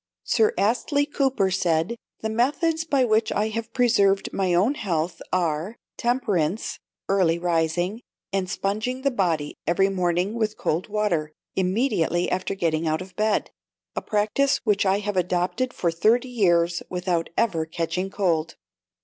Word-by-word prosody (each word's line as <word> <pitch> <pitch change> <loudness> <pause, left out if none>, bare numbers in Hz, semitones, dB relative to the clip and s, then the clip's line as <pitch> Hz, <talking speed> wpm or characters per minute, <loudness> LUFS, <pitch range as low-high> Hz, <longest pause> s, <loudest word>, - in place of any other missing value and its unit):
Sir 440 0 +3
Astley 265 +7 +1
Cooper 270 -9 +1
said, 175 +2 +1 0.3
"The 220 - -2
methods 310 +8 +1
by 280 -4 +2
which 220 -1 +2
I 215 +1 0
have 230 +1 -4
preserved 215 -6 +2
my 190 -2 0
own 190 +10 +3
health 175 - -2
are 175 +3 -1 0.2
temperance, 215 -7 0 0.3
early 185 -4 +3
rising, 175 +4 0 0.3
and 190 -2 0
sponging 215 +8 -2
the 275 - +2
body 165 - 0
every 190 +3 +3
morning 180 +1 0
with 220 -2 -1
cold 165 +4 -1
water, 205 -8 0 0.2
immediately 185 -3 +1
after 185 +1 -1
getting 165 -3 0
out 155 +3 0
of 185 -1 -16
bed, 215 +1 0 0.4
a - - -1
practice 215 +7 +1
which 205 -4 +2
I 190 +1 +3
have 205 -1 -3
adopted 180 +7 0
for 170 -8 -1
thirty 230 +9 +2
years 175 -7 +2
without 180 -2 -1
ever 170 -9 +1
catching 170 +3 -2
cold." 170 -5 0
195 Hz, 145 wpm, -24 LUFS, 175-225 Hz, 0.4 s, Sir